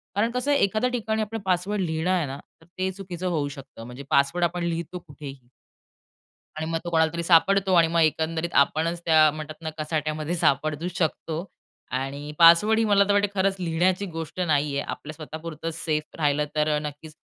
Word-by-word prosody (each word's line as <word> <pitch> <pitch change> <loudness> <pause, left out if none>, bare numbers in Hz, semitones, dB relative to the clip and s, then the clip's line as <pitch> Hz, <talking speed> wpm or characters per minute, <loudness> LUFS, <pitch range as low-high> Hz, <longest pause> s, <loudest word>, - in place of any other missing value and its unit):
कारण 225 +3 +1
कसं 250 +4 -1
आहे 280 - +3
एखाद्या 215 +5 +1
ठिकाणी 220 -3 -1
आपला 220 +1 -3
पासवर्ड 190 +3 0
लिहिणं 160 0 -1
आहे 180 -4 +1
ना 135 +1 -6 0.2
तर - - -19
ते 185 0 -1
चुकीचं 185 -2 -6
होऊ 155 -5 0
शकतं. 135 -4 -11
म्हणजे 125 +3 -9
पासवर्ड 140 +6 +2
आपण 175 +1 -2
लिहितो 170 +1 -3
कुठेही. 140 -5 -11 1.1
आणि 160 - -3
मग 165 - 0
तो 175 - -4
कोणाला 160 -1 +2
तरी 170 0 -3
सापडतो 190 +3 +4
आणि 165 -1 +5
मग 170 +1 +1
एकंदरीत 160 +2 0
आपणच 165 +4 -3
त्या 155 -2 +6
म्हणतात 155 0 -7
ना, 160 - -3
कचाट्यामध्ये 155 +1 -2
सापडू 155 +2 0
शकतो. 165 +1 -2 0.5
आणि 140 +3 -4
पासवर्डही 210 +7 +6
मला 200 -1 +4
तर 205 - +3
वाटतं 205 0 +3
खरंच 195 0 +2
लिहिण्याची 180 +3 +1
गोष्ट 165 +2 -6
नाहीये. 145 -4 +1
आपल्या 155 - -7
स्वतःपुरतं 155 +1 -7
सेफ 155 -2 -3
राहिलं 150 -1 +1
तर 150 0 +2
नक्कीच. 150 +1 -8
165 Hz, 175 wpm, -25 LUFS, 155-185 Hz, 1.1 s, त्या